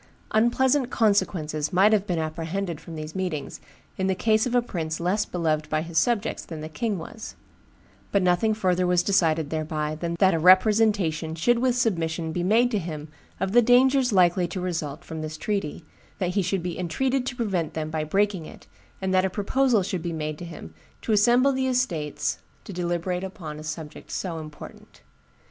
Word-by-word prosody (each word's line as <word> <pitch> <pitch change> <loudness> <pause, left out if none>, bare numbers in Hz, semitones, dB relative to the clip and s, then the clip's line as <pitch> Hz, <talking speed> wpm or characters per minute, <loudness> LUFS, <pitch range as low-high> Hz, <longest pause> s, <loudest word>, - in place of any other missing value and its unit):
Unpleasant 250 +4 +2
consequences 165 - +1
might 195 +4 +5
have 205 -1 +2
been 175 - -1
apprehended 165 +2 -3
from 165 0 -9
these 155 0 -6
meetings, 175 -7 -4 0.4
in 190 - +1
the 190 - +1
case 220 +3 +2
of 245 - -1
a 245 - +5
prince 160 -7 -4
less 185 +5 +1
beloved 155 -3 -1
by 155 0 0
his 165 -1 0
subjects 230 -3 0
than 160 -2 -8
the 155 - -5
king 210 +5 -2
was; 200 +6 -8 0.8
but 200 -2 +2
nothing 180 +5 +2
further 185 -3 +1
was 180 0 +3
decided 160 -6 +2
thereby 155 -1 -2
than 170 +2 -3
that 190 +1 +4
a 165 - +1
representation 185 -3 +4
should 235 +9 +2
with 250 0 +2
submission 165 -8 0
be 175 - -2
made 225 +7 +3
to 215 - +1
him 155 -3 -6 0.3
of 190 - -1
the 240 +3 +6
dangers 250 +2 +4
likely 180 -2 +3
to 180 +2 -5
result 170 -3 -4
from 160 -1 -6
this 155 0 -5
treaty, 175 -4 -3 0.3
that 180 -2 -1
he 200 - +2
should 180 0 -1
be 175 -1 -4
entreated 255 +10 0
to 250 -1 -4
prevent 195 - -2
them 155 -1 -3
by 160 -1 -1
breaking 195 0 0
it, - - -13 0.4
and 190 0 0
that 185 0 +4
a 190 - +1
proposal 220 +3 +1
should 185 -2 -3
be 170 0 -3
made 155 -2 -4
to 175 - -6
him 155 - -10 0.3
to - - -2
assemble 240 +6 +4
the 260 0 0
estates 150 - -1 0.2
to 200 - -8
deliberate 175 +1 -2
upon 165 -6 -7
a - - -8
subject 155 0 -7
so 170 -4 -3
important. 155 -1 -11
180 Hz, 190 wpm, -25 LUFS, 160-215 Hz, 0.8 s, the